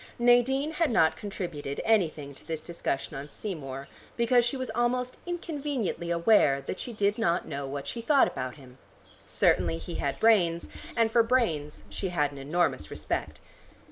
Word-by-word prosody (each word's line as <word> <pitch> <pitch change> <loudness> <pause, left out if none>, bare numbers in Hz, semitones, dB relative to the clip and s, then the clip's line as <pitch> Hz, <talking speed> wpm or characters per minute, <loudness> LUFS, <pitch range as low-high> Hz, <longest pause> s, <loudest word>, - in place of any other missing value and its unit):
Nadine 245 +5 +3
had 325 0 +1
not 160 -8 +3
contributed 160 -7 -5
anything 160 -10 +1
to - - -13
this 160 -1 -2
discussion 155 -3 -3
on 140 +2 -6
Seymour, 140 -10 -6 0.3
because 240 +1 +4
she 240 +3 -1
was 255 -3 -3
almost 250 +1 0
inconveniently 290 - -3
aware 170 -5 +4
that 140 - -5
she 245 - -4
did 205 0 0
not 175 -5 +1
know 140 -2 -4
what 140 +1 -5
she 235 - -4
thought 280 +3 +4
about 130 -1 -4
him. 130 -3 -15 0.5
Certainly 85 -3 +2
he 80 - -7
had 140 -1 -2
brains, 180 -7 +3 0.3
and 225 -1 +3
for 235 - +5
brains 200 - 0
she 190 - -3
had 150 -5 +1
an 140 - -9
enormous 145 - 0
respect. - - -4
175 Hz, 165 wpm, -28 LUFS, 145-240 Hz, 0.5 s, for